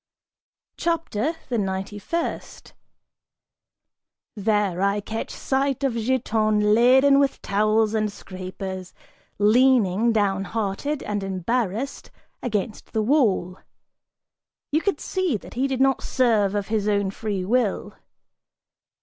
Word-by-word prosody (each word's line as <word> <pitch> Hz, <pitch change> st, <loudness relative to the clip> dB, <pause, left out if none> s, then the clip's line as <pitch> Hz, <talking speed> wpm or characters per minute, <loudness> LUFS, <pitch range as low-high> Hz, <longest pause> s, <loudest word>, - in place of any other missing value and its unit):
CHAPTER 330 Hz, -4 st, -1 dB
THE 240 Hz, -3 st, 0 dB
NINETY 195 Hz, +1 st, -3 dB
FIRST. 335 Hz, -, -4 dB, 1.6 s
(There) 205 Hz, -3 st, 0 dB
I 200 Hz, +1 st, +2 dB
catch 220 Hz, +2 st, -5 dB
sight 275 Hz, 0 st, -1 dB
of 270 Hz, -3 st, +1 dB
Giton 215 Hz, -3 st, +1 dB
laden 265 Hz, +5 st, +5 dB
with 280 Hz, -1 st, +1 dB
towels 215 Hz, +2 st, +2 dB
and 215 Hz, -1 st, 0 dB
scrapers, 185 Hz, -1 st, -7 dB, 0.4 s
leaning, 225 Hz, -1 st, +4 dB
downhearted 205 Hz, +6 st, -1 dB
and 205 Hz, -1 st, -2 dB
embarrassed, 210 Hz, +6 st, -2 dB, 0.3 s
against 215 Hz, -2 st, -3 dB
the 220 Hz, -, +1 dB
wall. 210 Hz, -, +1 dB, 1.1 s
You 310 Hz, +2 st, +2 dB
could 400 Hz, -, -1 dB
see 370 Hz, -, -1 dB
that -, -, -13 dB
he 260 Hz, +3 st, 0 dB
did 265 Hz, -2 st, -2 dB
not 270 Hz, 0 st, +3 dB
serve 220 Hz, -6 st, +2 dB
of 205 Hz, -1 st, -2 dB
his 215 Hz, -2 st, 0 dB
own 200 Hz, -2 st, +1 dB
free 200 Hz, -3 st, -3 dB
will. 230 Hz, 0 st, 0 dB
215 Hz, 110 wpm, -24 LUFS, 200-260 Hz, 1.6 s, laden